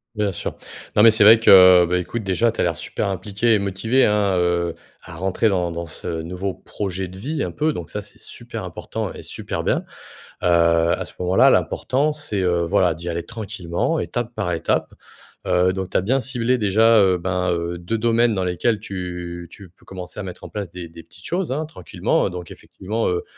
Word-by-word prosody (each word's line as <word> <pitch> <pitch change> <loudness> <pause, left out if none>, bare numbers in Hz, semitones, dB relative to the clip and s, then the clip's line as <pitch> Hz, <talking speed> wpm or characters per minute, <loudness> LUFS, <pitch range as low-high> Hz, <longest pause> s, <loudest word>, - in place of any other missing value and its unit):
Bien 105 -2 0
sûr, - - -5 0.4
non, 105 - +7
mais 115 - +9
c'est 110 -1 +4
vrai 110 +2 +8
que, 90 -4 +8
bah, 90 - +2
écoute, 110 +6 -4
déjà, 100 +5 +1
tu 115 - -12
as - - +3
l'air 85 -1 0
super - - -3
impliqué 100 +4 0
et 105 - +3
motivé, 100 +7 +1
hein, 105 -2 +2
heu, 85 -1 0 0.3
à 80 +1 -11
rentrer 95 +5 0
dans 90 -4 0
dans 85 0 -5
ce 80 0 -5
nouveau 90 +3 -4
projet 95 -1 -5
de 90 +1 -11
vie, 150 +11 -3
un - - -5
peu, 155 +1 0
donc 85 - -6
ça, - - -4
c'est - - -12
super - - -7
important - - -5
et - - -10
super - - -5
bien. - - 0 0.6
Heu, - - +2 0.5
à - - -4
ce - - -12
moment-là, 90 +1 +4
l'important, 145 +4 +1
c'est, 145 -10 -2
heu, 90 -2 +1
voilà, 95 -1 +2
d'y 85 +2 -9
aller 85 0 -3
tranquillement, 100 - -3
étape 120 -1 -3
par 90 - -2
étape. 80 - -1 0.5
Heu, 90 +1 +3
donc, 95 -1 -5
tu - - -18
as - - +2
bien 125 +9 +1
ciblé, 125 -1 0
déjà, 110 +1 +4
heu, 95 -2 +4
ben, 90 0 -1
heu, 85 0 -3
2 90 +6 -3
domaines 115 0 +2
dans 95 - -1
lesquels 95 +5 0
tu 90 -2 -6
tu 100 -3 -13
peux 85 - -27
commencer 90 -2 -8
à - - -4
mettre 90 -2 -9
en - - -9
place 100 -4 -5
des 85 -2 -8
des 85 0 -12
petites 90 +3 -14
choses, 180 -4 -2
hein, 155 +3 -2
tranquillement 150 - -1
heu. - - -3
Donc, 90 -2 -8
effectivement, 110 +4 -4
heu, 90 -1 -1
95 Hz, 215 wpm, -21 LUFS, 90-110 Hz, 0.6 s, mais